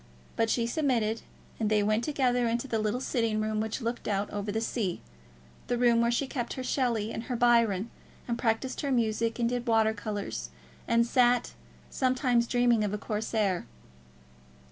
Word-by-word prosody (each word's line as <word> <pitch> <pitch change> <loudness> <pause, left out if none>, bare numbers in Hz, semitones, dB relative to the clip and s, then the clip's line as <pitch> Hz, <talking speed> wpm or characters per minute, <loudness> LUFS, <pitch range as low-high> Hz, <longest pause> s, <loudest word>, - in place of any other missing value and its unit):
But 225 0 +1
she 230 +1 +1
submitted, 235 -5 0 0.4
and 220 -2 +1
they 210 -1 +3
went 215 +3 +1
together 250 -4 +1
into 235 +3 -1
the 225 -4 -1
little 215 +3 0
sitting 230 -4 0
room 215 0 -1
which 220 +4 -3
looked 235 +1 -3
out 200 0 -1
over 205 0 -3
the 220 - -1
sea, 220 -5 -2 0.7
the 245 - 0
room 235 -1 +4
where 235 - +3
she 240 +4 +1
kept 245 -3 -4
her 260 - -5
Shelley 235 -5 0
and 225 - -5
her 250 - -3
Byron, 230 -3 +3 0.4
and 235 - 0
practised 235 +2 -1
her 280 - -1
music 230 -2 +1
and 235 -1 +1
did 245 0 -2
water 220 -1 +3
colours, 205 - -4 0.4
and 235 0 +3
sat, 245 0 +2 0.4
sometimes, 255 -2 +1
dreaming 240 -3 +3
of 210 0 -1
a - - -2
Corsair. 210 -3 -1
230 Hz, 175 wpm, -29 LUFS, 215-245 Hz, 0.7 s, room